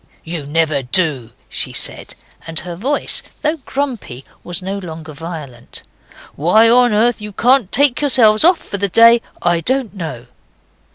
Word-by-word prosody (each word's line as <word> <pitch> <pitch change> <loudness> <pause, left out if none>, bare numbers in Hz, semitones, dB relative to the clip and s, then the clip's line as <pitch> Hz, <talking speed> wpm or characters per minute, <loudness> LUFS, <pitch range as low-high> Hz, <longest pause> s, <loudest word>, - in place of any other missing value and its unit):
'You 160 -3 -6
never 155 -2 0
do,' 135 -3 +1 0.2
she - - -5
said, - - 0 0.3
and 160 -1 -4
her 175 +1 -7
voice, 265 +11 -1 0.2
though 310 +2 0
grumpy, 255 - -5 0.2
was 175 -1 -3
no 195 +2 -4
longer 160 -4 -9
violent. 145 -6 -9 0.5
'Why 195 +10 +4
on 245 +1 +4
earth 225 +2 +1
you 210 0 -7
can't 245 -2 +2
take 280 -1 +2
yourselves 230 -7 +4
off 350 +1 +5
for 200 - -5
the 200 0 0
day 230 +4 +6 0.2
I 175 -1 +2
don't 255 +3 -2
know. 155 - -7
195 Hz, 155 wpm, -17 LUFS, 160-240 Hz, 0.5 s, day